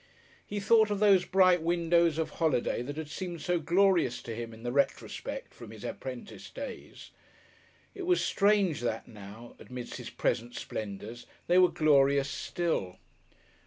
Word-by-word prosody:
He 205 - -3
thought 220 +1 +4
of 205 - -1
those 195 -3 +5
bright 185 -2 +4
windows 170 -1 +2
of 160 - -2
holiday 135 -8 0
that 145 +4 -6
had 160 -1 -4
seemed 175 +1 -6
so 175 +1 +1
glorious 170 -5 +2
to 115 - -6
him 115 0 -6
in 110 0 -13
the 120 - -2
retrospect 140 - -2
from - - -11
his - - -11
apprentice - - -7
days. - - -9 0.8
It 380 -3 -6
was 360 -1 +3
strange 200 - +2
that 115 -2 -3
now, 110 +2 -12
amidst 125 -1 -8
his - - -7
present 120 +1 -2
splendours, 110 +3 -6 0.2
they 180 +1 +4
were 180 -1 +6
glorious 140 -2 +3
still! 155 - -2
160 Hz, 155 wpm, -30 LUFS, 120-185 Hz, 0.8 s, were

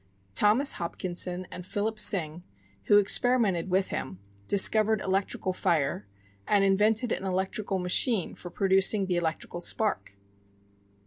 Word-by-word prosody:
Thomas 220 - +2
Hopkinson 180 +1 -1
and 180 - -9
Philip 210 +4 -4
Syng, 170 -5 +4 0.4
who 205 - +4
experimented 205 -3 +2
with 190 +1 -1
him, 95 - -6 0.3
discovered 215 +2 +4
electrical 190 -1 -3
fire, 155 - -2 0.4
and 200 -1 +2
invented 210 +4 +1
an - - -3
electrical 190 +1 -3
machine 185 +3 0
for 175 - -11
producing 195 +2 +1
the 180 -2 -2
electrical 170 +1 -5
spark. 175 - -2
190 Hz, 120 wpm, -26 LUFS, 180-210 Hz, 0.4 s, Syng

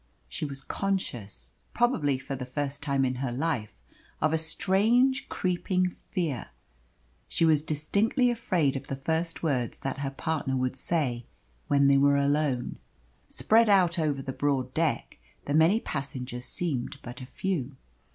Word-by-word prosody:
She - - -4
was 135 -2 -6
conscious, 115 - -3 0.2
probably 165 - +2
for 135 +1 -5
the 130 - -5
first 140 +1 -3
time 140 -1 +1
in 130 - 0
her 130 -3 -1
life, 125 -4 -2 0.4
of 155 +1 +2
a - - +4
strange, 215 +11 +2
creeping 180 0 0
fear. 170 - -3 0.8
She 165 - +1
was 155 -2 +4
distinctly 200 - +1
afraid 180 - +1
of 135 +1 -5
the 135 - -3
first 160 +5 -2
words 130 -7 -1
that 135 0 -3
her 140 -1 -1
partner 135 -1 -2
would 130 0 -1
say 130 -5 -1 0.4
when 140 -1 +4
they 140 0 +6
were 140 +1 +5
alone. 140 -3 0 0.5
Spread 225 0 +4
out 180 -3 +4
over 145 -4 0
the 130 - -4
broad 130 -3 0
deck 160 - -1 0.3
the 145 - -2
many 165 +8 +5
passengers 130 - -5
seemed 145 -9 -2
but 120 +1 -8
a - - -6
few. 145 -7 -3
145 Hz, 150 wpm, -28 LUFS, 135-175 Hz, 0.8 s, they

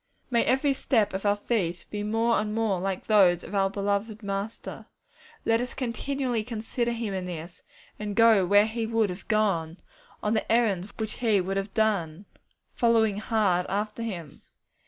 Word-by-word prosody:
May 235 -1 +3
every 270 +2 +2
step 225 -6 +1
of 195 +2 -2
our 205 - +4
feet 195 -5 -2
be 210 - -3
more 225 +3 +1
and 210 0 -2
more 220 -5 +1
like 190 0 -3
those 185 -5 +4
of - - -9
our 195 -1 +2
beloved 205 +2 -2
Master. 200 +2 -5 0.6
Let 225 +1 +3
us 250 - -5
continually 255 -1 -2
consider 235 +1 -2
Him 230 -3 -3
in 185 -1 -3
this, 170 0 -7 0.4
and 210 -1 -4
go 225 -4 +6
where 205 +3 +5
He 225 0 -3
would 225 -3 +1
have 180 +2 -9
gone, 190 -6 +1 0.5
on 210 - +1
the 220 - -1
errands 210 -5 +2
which 220 -1 -4
He 220 -4 +2
would 190 +2 -2
have 195 0 -4
done, 200 -5 0 0.5
'following 225 -3 +3
hard' 210 -6 +1
after 210 +4 -2
Him. 175 -10 -6
210 Hz, 170 wpm, -27 LUFS, 195-225 Hz, 0.6 s, go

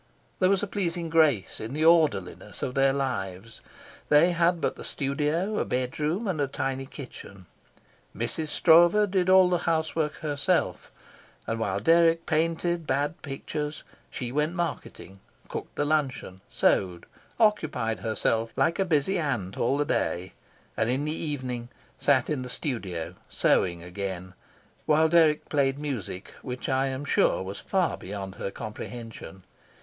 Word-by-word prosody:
There 185 - +4
was 195 0 +2
a - - -1
pleasing 175 -4 -2
grace 155 - +3
in 110 +4 -6
the 155 +2 0
orderliness 105 - +2
of 125 - -2
their 135 0 +4
lives. 115 -6 -4 0.5
They 155 +4 +6
had 170 0 +2
but - - -1
the - - -9
studio, 150 +9 -1
a - - +2
bedroom, 150 - -1
and 165 -6 -1
a 140 - +1
tiny 135 0 -3
kitchen. 110 -9 -10 0.7
Mrs. 120 +8 -2
Stroeve 175 +6 +5
did 185 -2 +2
all 185 -1 +7
the 180 -1 +1
housework 160 -1 0
herself; 145 -3 0 0.5
and 115 0 -2
while 100 -3 -1
Dirk 165 +6 +4
painted 165 +1 0
bad 145 +4 -1
pictures, 150 +2 -5 0.3
she 125 -3 -5
went 150 +5 0
marketing, 160 - -5 0.3
cooked - - -7
the 145 - 0
luncheon, 135 -11 -1
sewed, 90 -3 +1 0.3
occupied 155 - +1
herself 115 0 0
like 170 +3 +1
a 195 - +3
busy 170 +2 +1
ant 115 - -2
all 130 +4 +1
the 145 - +1
day; 90 - -1 0.4
and 110 +1 0
in 135 +4 0
the 150 - -1
evening 130 -7 -4 0.3
sat 135 -3 +3
in 150 -4 -1
the 125 - -6
studio, 100 - -3 0.2
sewing 85 -2 +1
again, 90 0 -5 0.5
while 155 +1 +5
Dirk 160 -2 +4
played 140 -2 +1
music 125 -10 -5
which 125 -1 -5
I 135 0 +1
am 135 +1 -4
sure 110 - +2
was 95 +1 -6
far 190 -3 0
beyond 95 0 -6
her - - -2
comprehension. 110 -2 -8
140 Hz, 150 wpm, -27 LUFS, 115-165 Hz, 0.7 s, all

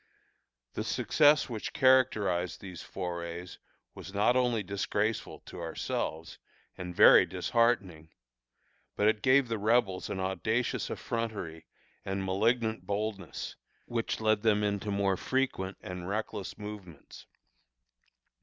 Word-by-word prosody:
The - - -3
success 150 0 +3
which 115 -4 -5
characterized 110 - +3
these 90 -4 -9
forays 85 -1 -6 0.3
was 95 - -10
not 105 +5 +3
only 120 -4 +2
disgraceful 100 +3 -2
to - - -10
ourselves, 80 +1 -4 0.4
and 90 -1 -7
very - - +8
disheartening, 100 -9 0 0.9
but 105 - +2
it 110 -1 +2
gave 130 +2 +4
the 115 -2 -2
Rebels 105 -3 +1
an 95 - -3
audacious 95 +6 -1
effrontery 105 -9 -4 0.4
and 95 0 -3
malignant 110 +4 0
boldness, 100 -3 -4 0.3
which 115 -1 -2
led 110 -1 +2
them 105 -2 +3
into 100 0 -1
more 100 -1 +1
frequent 130 -8 -1
and 90 0 -6
reckless 105 -1 -4
movements. 105 -7 -10
105 Hz, 115 wpm, -30 LUFS, 95-115 Hz, 0.9 s, very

